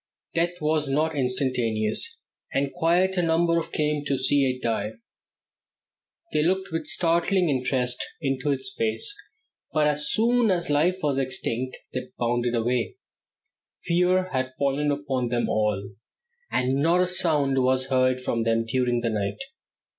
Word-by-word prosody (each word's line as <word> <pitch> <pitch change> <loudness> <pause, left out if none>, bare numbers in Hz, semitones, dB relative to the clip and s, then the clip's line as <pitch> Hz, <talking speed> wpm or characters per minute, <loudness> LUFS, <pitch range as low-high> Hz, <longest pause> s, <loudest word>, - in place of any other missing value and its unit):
Death 175 +1 0
was 150 -1 +1
not 155 +4 +1
instantaneous, 125 - +1 0.3
and 140 0 -1
quite 180 +3 +2
a - - +3
number 170 0 +2
came 150 -2 -1
around 145 0 -6
to 140 - +1
see 135 +1 +2
it 130 0 -4
die. 110 -2 -1 1.4
They 155 - +3
looked 190 +4 0
with 165 -1 -3
startling 170 +2 +2
interest 130 -2 0 0.2
into 135 -1 -1
its 140 +7 -2
face, 410 - 0 0.6
but 155 -1 +2
as 150 0 0
soon 235 +1 +3
as 175 -4 0
life 175 +6 +2
was 140 -2 +1
extinct 130 -1 -2 0.2
they 130 0 -4
bounded 120 0 0
away. 120 +1 0 0.9
Fear 180 +2 +2
had 130 -1 -2
fallen 140 +1 +1
upon 140 -3 -1
them 120 0 0
all, 105 -2 0 0.6
and 130 +2 +1
not 170 +4 +3
a - - +4
sound 150 -7 +1
was 130 +1 +1
heard 130 0 +3
from 115 -2 -1
them 115 0 +1
during 120 0 0
the 115 -1 -1
night. 100 -2 -2
140 Hz, 145 wpm, -25 LUFS, 125-170 Hz, 1.4 s, a